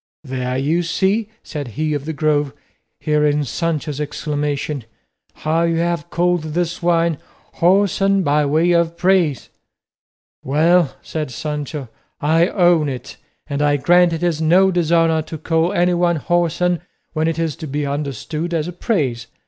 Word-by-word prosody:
"There, 130 -2 -3
you 155 +6 +1
see," 195 +5 0
said 145 -4 -6
he 155 0 0
of 145 -1 -3
the 160 - -3
Grove, 150 -2 0 0.5
hearing 150 -1 +1
Sancho's 150 0 -2
exclamation, 145 -2 -3 0.5
"how 160 +2 0
you 170 0 +1
have 170 -1 -1
called 175 0 +1
this 175 0 -1
wine 170 -2 +2 0.4
whoreson 195 +2 +3
by 150 -1 +2
way 160 +5 +2
of 170 -1 +1
praise." 180 - +1 0.9
"Well," 160 +2 +3
said 155 -3 -4
Sancho, 150 +1 -5 0.3
"I 160 +3 +3
own 175 -6 +3
it, 125 -1 -7 0.3
and 140 0 -3
I 145 0 +3
grant 175 +4 +4
it 165 +1 -3
is 165 -3 0
no 185 +4 +4
dishonour 165 -2 +2
to 160 +1 -7
call 165 +3 0
anyone 175 -2 +2
whoreson 175 +1 0 0.3
when 155 0 0
it 165 - -1
is 165 -3 -1
to 160 - -7
be 145 +1 -2
understood 150 +4 -3
as 160 0 -1
praise. 130 - -1
160 Hz, 145 wpm, -19 LUFS, 150-175 Hz, 0.9 s, grant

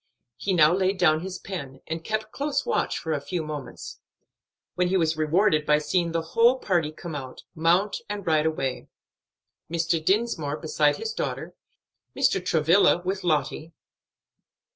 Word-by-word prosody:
He 190 - -1
now 155 -1 +6
laid 190 +1 +1
down 155 -4 +4
his 185 +2 -6
pen, 140 -9 -7
and 165 +1 -5
kept 215 +1 -3
close 290 0 -2
watch 475 - 0
for 160 - -3
a 145 - -2
few 170 +3 -3
moments, 150 -5 -7 0.7
when 180 0 +1
he 190 +1 +2
was 160 -2 +1
rewarded 155 +1 +2
by 150 0 +3
seeing 170 +3 0
the 165 0 -1
whole 240 +3 +5
party 175 -10 0
come 160 +1 -8
out, 130 -3 -7
mount, 175 +6 +2
and 205 -1 -4
ride 155 -1 +2
away; 135 -5 -3 0.8
Mr. 165 -1 0
Dinsmore 175 -7 0
beside 150 -2 +1
his 450 - -4
daughter, - - -4 0.6
Mr. 260 -9 +2
Travilla 170 +2 +3
with 190 +1 -2
Lottie. 155 0 -1
165 Hz, 155 wpm, -25 LUFS, 155-190 Hz, 0.8 s, now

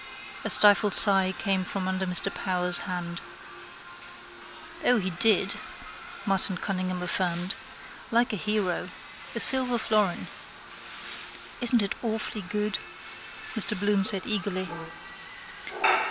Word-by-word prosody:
A - - -5
stifled 205 0 +6
sigh 195 -2 +5
came 195 -3 -3
from 185 +1 -6
under 190 0 -4
Mr 180 -1 +8
Power's 180 -2 +1
hand. 170 -1 -7 1.6
—O, 245 - +2
he 190 -3 -4
did, 215 +6 +2 0.7
Martin 195 -2 -1
Cunningham 185 -2 -5
affirmed. 180 0 -3 0.6
Like 235 -1 -1
a - - -2
hero. 210 -3 -4 0.5
A - - -3
silver 255 -2 +6
florin. 210 -5 -2 1.4
—Isn't 240 -2 +3
it 200 - -4
awfully 220 -2 -5
good? 210 +3 -5 0.7
Mr 210 -3 +1
Bloom 205 -1 -1
said 195 -2 +1
eagerly. 195 -3 -4
195 Hz, 110 wpm, -24 LUFS, 185-215 Hz, 1.6 s, Mr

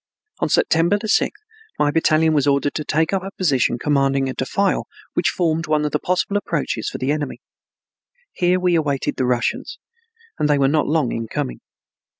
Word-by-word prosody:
On - - 0
September 170 +5 +3
sixth 420 - 0 0.3
my 145 - +2
battalion 160 0 +3
was 145 -2 +2
ordered 140 0 +2
to 155 - -3
take 160 +4 0
up 195 - +1
a 195 - -5
position 140 -9 +1
commanding 135 0 +1
a 130 - -3
defile 195 +11 0 0.3
which - - +1
formed 165 -1 0
one 150 -1 +1
of 150 - -1
the 150 - 0
possible 185 +3 0
approaches 150 - -2
for - - -6
the 130 +2 -1
enemy. 150 -2 -3 0.9
Here 180 +1 +1
we 180 -1 +2
awaited 145 -5 0
the 130 - 0
Russians, 125 -1 -1 0.6
and 150 - +1
they 145 - +4
were 135 -1 +3
not 150 +2 +1
long 150 -5 +1
in 115 -1 -3
coming. - - -4
150 Hz, 180 wpm, -21 LUFS, 135-165 Hz, 0.9 s, they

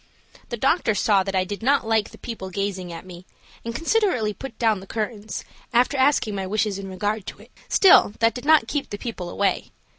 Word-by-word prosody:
The 235 - -4
doctor 265 - +2
saw 205 -1 +3
that 195 0 -3
I 185 - +3
did 200 +3 -6
not 265 -1 +2
like 220 -2 +1
the - - -14
people 220 -5 -7
gazing 190 -1 -3
at 165 +2 -8
me, 180 -1 -11 0.4
and 230 0 -5
considerately 330 - +1
put 265 +1 -9
down 220 -4 +2
the 190 - -12
curtains, 215 0 -4 0.3
after 250 +3 +3
asking 265 -5 +2
my 195 -1 -3
wishes 205 0 -1
in 195 -1 -7
regard 205 +2 -3
to - - -7
it. - - -21 0.2
Still 360 - +6
that 230 0 +3
did 250 - -7
not 295 -5 +5
keep 290 +1 -3
the 205 - -5
people 200 -6 -6
away. 195 +1 -1
215 Hz, 210 wpm, -23 LUFS, 195-245 Hz, 0.4 s, Still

